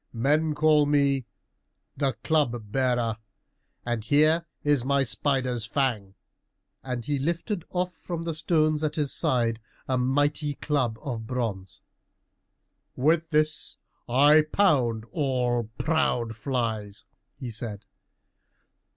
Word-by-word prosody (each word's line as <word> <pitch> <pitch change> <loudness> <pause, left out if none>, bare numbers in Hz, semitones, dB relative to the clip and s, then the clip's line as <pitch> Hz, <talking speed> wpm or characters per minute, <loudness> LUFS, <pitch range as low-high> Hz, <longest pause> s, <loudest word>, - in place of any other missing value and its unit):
"Men 150 +6 +1
call 150 -1 +4
me 140 -3 +2 0.7
the 135 -3 0
Club 120 -9 0
bearer, 120 -3 0 0.7
and 120 -2 -2
here 155 +6 +3 0.2
is 145 -4 +2
my 140 +1 +2
spider's 130 -2 0
fang," 110 -9 -1 0.7
and 125 -3 -4
he 145 -1 -1
lifted 170 - -2
off 180 0 -2
from 165 +1 -6
the 165 -1 -2
stones 155 -1 +1
at 155 0 -1
his 150 -3 -1
side 120 -7 +1 0.3
a 130 -1 +1
mighty 145 +3 +1
club 130 -8 -1
of 115 -5 -5
bronze. 110 -7 -4 1.1
"With 160 +5 +2
this 155 0 0 0.3
I 145 +5 +6
pound 125 - +2
all 125 - 0
proud 150 -8 0
flies," 110 -4 -3 0.3
he 125 -3 -6
said. 110 -2 -6
135 Hz, 115 wpm, -26 LUFS, 120-155 Hz, 1.1 s, I